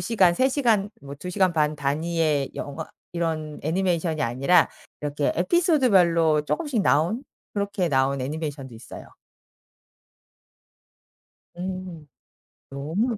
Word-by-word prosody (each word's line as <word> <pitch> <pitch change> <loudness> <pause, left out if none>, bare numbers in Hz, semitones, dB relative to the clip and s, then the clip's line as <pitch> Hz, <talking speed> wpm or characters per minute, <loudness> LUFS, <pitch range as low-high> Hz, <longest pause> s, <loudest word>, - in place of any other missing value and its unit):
시간, 190 -7 +3
3 260 +6 +3
시간, 225 -7 +1
뭐 140 0 -8
2 180 +5 -6
시간 185 -2 +2
반 150 -1 +1
단위의 150 0 0
영화 150 +3 -5 0.3
이런 160 -3 -3
애니메이션이 170 -2 0
아니라 135 +9 +3 0.3
이렇게 145 0 -1
에피소드 300 - +3
별로 165 -5 +4
쪼금씩 280 - -1
나온 175 - +2 0.3
그렇게 200 -3 -1
나온 135 -1 +1
애니메이션도 140 -2 -5
있어요. 110 - -10 2.5
음. 185 -3 -6 0.7
너무 180 - -1
165 Hz, 250 characters per minute, -25 LUFS, 150-195 Hz, 2.5 s, 별로